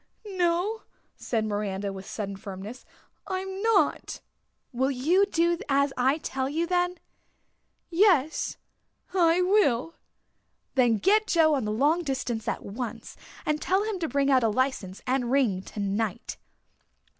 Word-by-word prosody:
"No," 370 +2 0 0.3
said 225 -3 -2
Miranda, 205 -1 -2
with 190 0 -9
sudden 200 -2 -4
firmness, 195 +5 -8 0.4
"I'm 380 0 -4
not." 445 -2 +1 0.5
"Will 260 +3 +1
you 325 +10 +2
do 340 -2 +1
as 280 0 +2
I 265 +4 +2
tell 265 -4 -3
you 325 +4 0
then?" 355 0 0 1.0
"Yes, 335 -5 +2 0.6
I 350 -1 +4
will." 330 - +2 0.8
"Then 245 -4 +3
get 420 - +3
Joe 320 -4 +4
on 265 -6 0
the 210 - -1
long 290 +10 +2
distance 255 -7 -3
at - - -3
once 230 +4 -6 0.3
and 300 0 0
tell 380 +2 +1
him 425 -3 -3
to 330 - -1
bring 280 0 +1
out 260 -1 +5
a 225 - +2
license 210 -5 -2
and 250 -1 0
ring 245 -9 +2
tonight." 205 +3 -3
275 Hz, 135 wpm, -27 LUFS, 225-355 Hz, 1.0 s, out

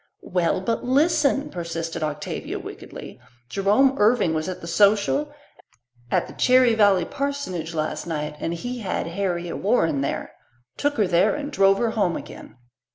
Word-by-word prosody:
"Well, 180 0 0
but 225 +4 -2
listen," 285 +1 +2
persisted 165 -1 -4
Octavia 150 -1 -4
wickedly. - - -9 0.3
"Jerome 205 - +3
Irving 210 -5 +3
was 155 +3 -2
at 185 - -5
the - - -9
social 205 - +2 0.8
at - - +1
the - - -11
Cherry 255 -2 +4
Valley 200 -5 +4
parsonage 185 - -4
last 155 +2 -3
night, 150 -2 -3
and 165 - -2
he 245 +8 -5
had 195 -5 -2
Harriet 175 -1 -3
Warren 165 - +1
there 140 - -3 0.4
took 290 0 0
her 210 - +3
there, 180 +2 +3
and 295 0 -5
drove 195 -5 +4
her 230 +1 0
home 205 -6 0
again." - - -11
195 Hz, 155 wpm, -23 LUFS, 170-250 Hz, 0.8 s, Cherry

